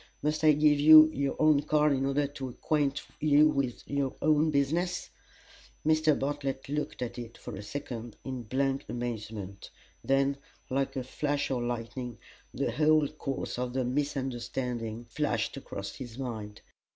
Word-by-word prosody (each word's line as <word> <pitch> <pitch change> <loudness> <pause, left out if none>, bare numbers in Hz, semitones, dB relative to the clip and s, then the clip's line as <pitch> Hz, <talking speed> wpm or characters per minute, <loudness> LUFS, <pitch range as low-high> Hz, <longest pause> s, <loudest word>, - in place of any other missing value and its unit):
Must 150 +1 0
I 155 -1 +7
give 150 0 +4
you 155 +1 +9
your 140 0 -1
own 155 -2 +4
card 150 0 +3
in 135 0 0
order 140 +1 +1
to 140 -2 -6
acquaint 145 +2 -1 0.2
you 150 0 +5
with 140 -5 -2
your 140 -2 -1
own 155 +1 +3
business?" 160 +5 0 0.7
Mr. 155 -1 +4
Bartlett 140 -1 -3
looked 145 -2 -3
at 120 0 -5
it 115 -1 -8
for - - -8
a 95 - -6
second 115 0 -6
in 130 -2 -4
blank 135 +4 -1
amazement; 110 -5 -5 0.3
then, 135 +1 +2 0.3
like 135 +1 0
a 130 - -2
flash 145 +3 -2
of 125 -2 0
lightning, 120 0 -4 0.3
the - - -1
whole 155 -1 +3
course 135 -4 -4
of 125 0 -2
the 130 -1 0
misunderstanding 125 -4 -3
flashed - - -1
across 100 0 -7
his 120 -3 -8
mind. 110 -6 -6
135 Hz, 150 wpm, -29 LUFS, 120-150 Hz, 0.7 s, you